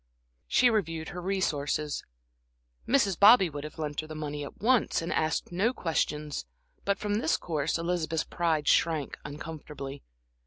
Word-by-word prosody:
She 250 -1 +4
reviewed 165 -7 -1
her 180 - -6
resources. 150 -6 -1 0.8
Mrs. 210 -9 +2
Bobby 200 -4 +8
would 145 0 -6
have 150 - -8
lent 150 -2 -3
her 155 - -10
the 155 - -7
money 150 -1 -4
at 140 - -9
once 245 +1 +3
and 165 0 -2
asked 155 +2 0
no 200 +8 +1
questions; 150 - -1 0.4
but 200 0 +1
from 205 +1 -1
this 160 - +2
course 155 -3 -1
Elizabeth's 165 -2 -1
pride 160 -4 0
shrank 160 -4 +2
uncontrollably. 145 -2 -7
160 Hz, 150 wpm, -29 LUFS, 150-190 Hz, 0.8 s, Bobby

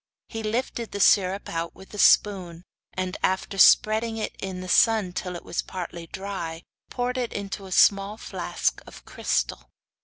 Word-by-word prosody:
He 225 - -5
lifted 230 +1 -3
the 200 - -4
syrup 195 0 +3
out 165 0 -4
with 190 - -15
a 210 - -7
spoon, 180 -6 +3 0.3
and 185 0 -3
after 190 +1 -1
spreading 220 +3 +5
it 220 - -4
in 190 -1 -5
the 185 - -7
sun 210 -1 +3
till 180 0 -4
it 175 - -9
was - - -2
partly 170 -2 -7
dry, 175 -4 -6 0.3
poured 250 +1 -2
it 240 -3 -2
into 200 -1 -6
a - - -12
small 200 +3 +4
flask - - -2
of - - -13
crystal. - - -2
195 Hz, 165 wpm, -25 LUFS, 180-215 Hz, 0.3 s, spreading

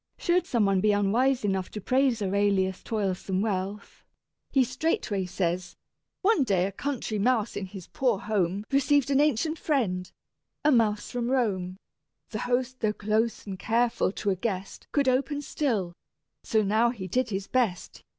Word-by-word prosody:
Should 355 +1 +1
some 230 -4 +2
one 195 -1 +2
be 210 +1 +3
unwise 235 +6 +2
enough 190 -2 -1
to 210 - -6
praise 255 0 +1
Arellius' 195 -1 +1
toilsome 195 -3 -2
wealth, 200 -1 -3 0.5
he 270 -2 +4
straightway 250 - -1
says: 180 0 -2 0.5
"One 395 -6 +4
day 190 -6 +2
a 195 - -2
country 230 -1 -3
mouse 235 0 +1
in 190 - -4
his 185 -2 -9
poor 255 -6 0
home 200 -1 -1
Received 280 0 +3
an 275 - +4
ancient 300 +2 +1
friend, 195 - -1 0.5
a 300 - +6
mouse 215 -5 +2
from 240 -1 -2
Rome: 190 -8 0 0.5
The 215 - -3
host, 250 +2 -1
though 215 -2 +1
close 215 +2 -1
and 190 -2 -6
careful, 230 -2 +1
to 205 - -1
a - - +1
guest 190 0 -4
Could 280 -2 +1
open 270 +3 +1
still: 220 - -1 0.5
so 220 -1 +2
now 220 +4 +3
he 205 -6 -5
did 255 +8 0
his 195 -2 -3
best. 230 -8 -1
215 Hz, 160 wpm, -27 LUFS, 195-255 Hz, 0.5 s, a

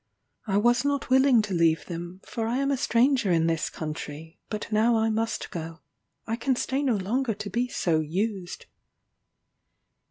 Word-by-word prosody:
I 195 -1 +1
was 240 +3 +3
not 285 -2 -1
willing 260 -3 +5
to 205 -2 -4
leave 165 -3 +2
them, 175 +2 -7
for 225 -1 -3
I 240 +2 0
am 275 +1 +1
a - - +2
stranger 245 -3 +2
in 165 -1 +3
this 165 -1 0
country, 155 0 -7
but 215 +1 -5
now 225 +2 +3
I 220 0 +2
must 225 +1 -2
go 165 -1 -6 0.4
I 225 - -1
can 265 +1 +1
stay 265 +3 -1
no 260 -5 +2
longer 225 +4 -1
to 210 0 -6
be 245 +1 0
so 170 -9 0
used." 185 +4 -3
215 Hz, 170 wpm, -26 LUFS, 170-240 Hz, 0.4 s, willing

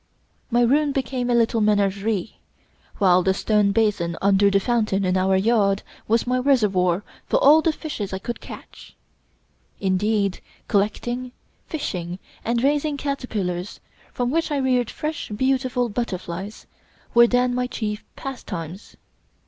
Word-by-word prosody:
My 240 0 +3
room 285 +4 +3
became 255 -2 -2
a 240 - +3
little 230 -1 +2
menagerie, 205 -1 0 0.6
while 185 -2 +4
the 190 +1 +1
stone 210 -1 +2
basin 200 -6 +1
under 200 0 +4
the 200 0 +3
fountain 215 -3 0
in 185 0 +1
our 190 +1 +2
yard 200 -1 +2 0.2
was 230 +1 +2
my 250 +1 +1
reservoir 205 -9 +2 0.2
for - - +2
all 300 +3 +6
the 325 - +2
fishes 295 -10 -5
I 190 - -2
could 235 +5 -6
catch. - - -12 0.8
Indeed, 200 +1 0 0.3
collecting, 240 +5 -1 0.3
fishing, 180 - -4 0.3
and 235 +1 0
raising 290 +1 +1
caterpillars, 210 -10 -3 0.3
from 245 0 -1
which 330 +2 0
I 295 - 0
reared 255 -3 +1
fresh, 305 +1 -4
beautiful 255 +2 0
butterflies, 200 -3 -5 0.5
were 235 -1 +7
then 245 +1 +2
my 250 0 0
chief 210 -3 -4
pastimes. 185 - -7
220 Hz, 135 wpm, -23 LUFS, 195-250 Hz, 0.8 s, were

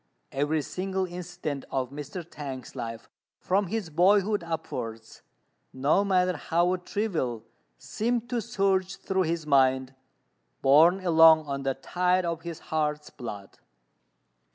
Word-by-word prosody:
Every 145 +2 0
single 190 +4 -2
incident 175 -5 -5
of 130 -2 -2
Mr. 150 +4 -7
T'ang's 135 -7 -8
life 115 -1 -6 0.3
from 195 +1 0
his 200 -3 -3
boyhood 200 +4 +3
upwards, 120 -9 -6 0.5
no 140 +9 +2
matter 185 -2 +2
how 175 +4 +1
trivial, 170 - -2 0.3
seemed 235 - -2
to 240 -2 0
surge 195 -4 0
through 190 -1 -1
his 165 -2 -2
mind, 130 -2 +3 0.7
borne 165 +7 +5
along 160 -2 +7
on 140 -1 -3
the 135 -1 -1
tide 180 +5 0
of 170 -1 -2
his 170 -1 -6 0.2
heart's 150 -1 -1
blood. 105 -6 -9
165 Hz, 125 wpm, -27 LUFS, 140-185 Hz, 0.7 s, along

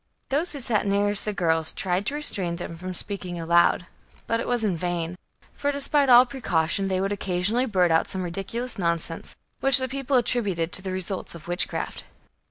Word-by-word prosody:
Those 310 +6 +1
who 285 - -6
sat 215 -4 +1
nearest 200 +1 +2
the 210 - -1
girls 160 -4 +1
tried 185 +1 -1
to 285 - -1
restrain 190 -12 +3
them 170 -1 -7
from 185 +2 -6
speaking 180 -3 -3
aloud; 170 +1 +3 0.4
but 230 - 0
it - - -4
was 245 -2 0
in 200 -5 +1
vain; 175 0 -3 0.4
for, 285 - -1
despite 280 0 +1
all 245 0 +8
precaution, 195 -8 0
they 190 -1 0
would 195 +1 -1
occasionally 200 +5 0
blurt 180 -5 +2
out 160 - +2
some 190 -1 -3
ridiculous 205 +7 -3
nonsense, 170 -2 -2 0.2
which 270 -1 +5
the 260 -1 +1
people 270 +1 0
attributed 200 -9 0
to - - +2
the 190 0 -5
results 185 -1 -4
of 170 - -12
witchcraft. 175 +1 -2
195 Hz, 185 wpm, -25 LUFS, 175-240 Hz, 0.4 s, all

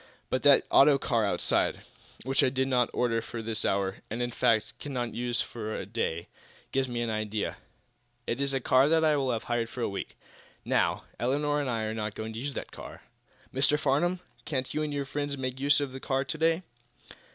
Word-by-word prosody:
But 130 - +1
that 145 -1 +6
auto 140 0 +7
car 115 -5 +1
outside, - - +1 0.4
which 135 +1 +2
I - - +4
did 130 0 0
not 125 -2 +2
order 115 -2 +1
for 115 0 -6
this 110 -1 -3
hour, 95 0 0
and, 110 - -3
in 120 0 -1
fact, 110 -2 +2
cannot 125 -5 -3
use 120 0 0
for 110 -2 -4
to - - -4
day, 95 -6 -2 0.4
gives 135 -1 +1
me 120 -1 -2
an 115 - -1
idea. 110 -1 -2 0.7
It 120 - -2
is 140 0 +1
a - - +2
car 130 +2 +4
that 160 0 +4
I 155 - +5
have 130 -6 0
hired 120 -1 -1
for 125 - -6
a - - +1
week. 100 - -5 0.5
Now, - - +1 0.2
Elinor 145 +5 +1
and 140 - -2
I 115 -2 -1
are 110 0 -2
not 105 -1 -3
going 110 0 -5
to 110 - -5
use 140 +1 -4
the - - -3
car. - - -11 0.5
Mr. 140 +3 +3
Farnum, 155 +5 +1 0.2
can't 130 -4 -2
you 155 - 0
and 150 -1 -1
your 140 -1 -2
friends 145 +1 -3
make 130 0 -3
use 145 +2 +4
of 140 -2 -2
the 130 - -7
car 135 +1 0
to 160 +3 -4
day?" 165 +2 +2
130 Hz, 210 wpm, -29 LUFS, 115-140 Hz, 0.7 s, auto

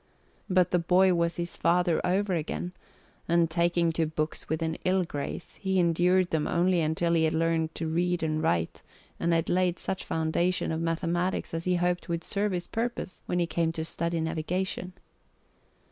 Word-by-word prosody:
But 185 -1 +3
the 180 - +3
boy 180 +2 +4
was 170 -1 +1
his 175 0 -3
father 175 -1 +2
over 190 +2 +1
again, 170 +2 -2 0.6
and 170 -1 +3
taking 170 0 +2
to 160 -1 0
books 155 0 -3
with 160 +1 -1
an 160 0 -2
ill 185 0 +2
grace, 145 +1 -6
he 190 -1 0
endured 180 +1 +3
them 155 -2 0
only 175 0 +2
until 160 +2 +1
he 160 -1 +3
had 160 - +1
learned 165 0 0
to 165 - -3
read 175 +1 0
and 155 -1 0
write 85 - 0 0.4
and 170 - +1
had 165 -1 +2
laid 180 -1 +1
such 190 - -4
foundation 165 +3 0
of 160 0 -2
mathematics 170 +3 -1
as 165 0 -3
he 180 0 +2
hoped 175 0 0
would 170 0 -2
serve 205 +1 -1
his 175 -1 -2
purpose 230 -3 -4
when 175 - 0
he 175 - +2
came 165 0 0
to 160 -1 -3
study 170 +1 -2
navigation. 180 +3 -2
170 Hz, 180 wpm, -28 LUFS, 160-180 Hz, 0.6 s, boy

